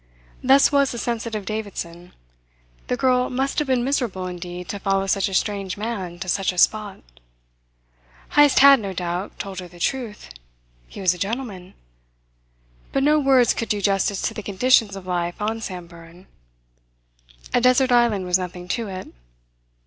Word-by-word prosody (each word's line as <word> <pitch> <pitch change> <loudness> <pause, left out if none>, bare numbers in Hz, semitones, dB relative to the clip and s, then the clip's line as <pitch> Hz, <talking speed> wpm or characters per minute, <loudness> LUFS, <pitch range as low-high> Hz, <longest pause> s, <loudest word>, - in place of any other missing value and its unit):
Thus 270 +2 +5
was 280 -1 +3
the 240 - -5
sensitive 230 -3 -3
Davidson. 180 -5 -6 0.7
The 250 - -1
girl 250 -1 +2
must 265 +3 -1
have 300 - -1
been 255 -2 +1
miserable 240 -9 -1
indeed 180 0 -7
to 200 - -4
follow 195 0 0
such 195 +1 +1
a - - -7
strange 200 -1 -1
man 200 -5 -4
to 190 - -5
such 195 +1 +1
a 180 - -11
spot. 210 +2 +2 1.3
Heyst 290 -1 +5
had, 275 -1 +8
no 200 -3 -5
doubt, 180 +2 -4
told 195 -2 -6
her 180 - -8
the 175 0 -16
truth. 235 0 -3 0.6
He - - -10
was 185 -2 +3
a 180 - -11
gentleman. 200 -3 -5 1.2
But 270 - 0
no 300 +2 +4
words 265 -4 +4
could 230 - -4
do 210 - 0
justice 195 0 0
to - - -1
the - - -6
conditions 210 +1 +2
of 195 -2 -9
life 175 -1 -2
on 220 +2 -2
Samburan. 170 -2 -9 1.3
A 245 - +3
desert 255 +1 +4
island 235 -6 +3
was 180 +1 +2
nothing 180 0 -6
to 230 -2 -2
it. 185 -1 -7
200 Hz, 165 wpm, -22 LUFS, 185-245 Hz, 1.3 s, had